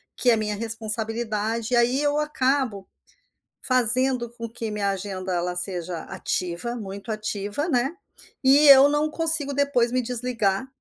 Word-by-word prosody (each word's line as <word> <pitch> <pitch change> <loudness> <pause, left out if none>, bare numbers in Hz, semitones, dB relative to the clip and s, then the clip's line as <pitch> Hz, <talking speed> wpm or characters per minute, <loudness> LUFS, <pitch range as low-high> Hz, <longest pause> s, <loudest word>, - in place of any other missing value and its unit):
que 250 - +1
é - - +4
minha 210 -1 -2
responsabilidade. 225 +1 -2
Aí 240 +3 +2
eu 290 0 +1
acabo 265 -8 -1 0.7
fazendo 255 0 +2
com 230 -1 -8
que 225 -1 -6
minha 205 -1 -1
agenda 190 -1 -4
ela 180 +1 -2
seja 180 -2 -2
ativa, 180 +7 -1
muito 200 0 -8
ativa, 215 - -2
né. 270 0 0 0.5
E 280 +3 +6
eu 275 0 +9
não 295 +1 0
consigo 320 -3 0
depois 275 -4 +1
me 255 - +1
desligar. 235 -3 -1
235 Hz, 140 wpm, -24 LUFS, 205-265 Hz, 0.7 s, eu